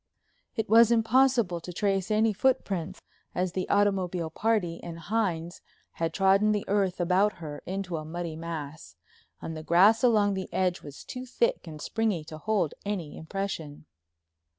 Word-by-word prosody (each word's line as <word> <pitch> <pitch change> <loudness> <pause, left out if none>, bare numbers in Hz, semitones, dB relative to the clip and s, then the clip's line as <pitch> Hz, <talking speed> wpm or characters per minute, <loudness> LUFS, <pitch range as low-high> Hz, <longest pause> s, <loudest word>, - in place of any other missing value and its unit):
It 220 -2 -1
was 230 +1 +7
impossible 235 -5 +3
to 180 - -7
trace 195 0 0
any 215 0 +3
footprints, 190 -6 -1 0.3
as 180 0 0
the 185 +1 -3
automobile 185 -5 +1
party 200 -4 0
and 170 -1 -7
Hines 175 -2 -2 0.3
had 165 -1 -2
trodden 195 +3 +3
the 210 - -2
earth 195 -2 +1
about 185 +4 +3
her 150 -3 -8
into 185 -2 -3
a 155 - -5
muddy 165 +1 -5
mass, 155 - -7 0.5
and 160 - -5
the 155 - -6
grass 190 +9 +5
along 210 -4 +4
the 190 -1 -5
edge 180 -1 0
was 145 -1 -10
too 255 0 -7
thick 475 - 0
and 155 -2 -8
springy 215 -3 -1
to 155 0 -9
hold 205 -5 0
any 190 -7 -4
impression. 160 -4 -5
185 Hz, 155 wpm, -28 LUFS, 165-215 Hz, 0.5 s, was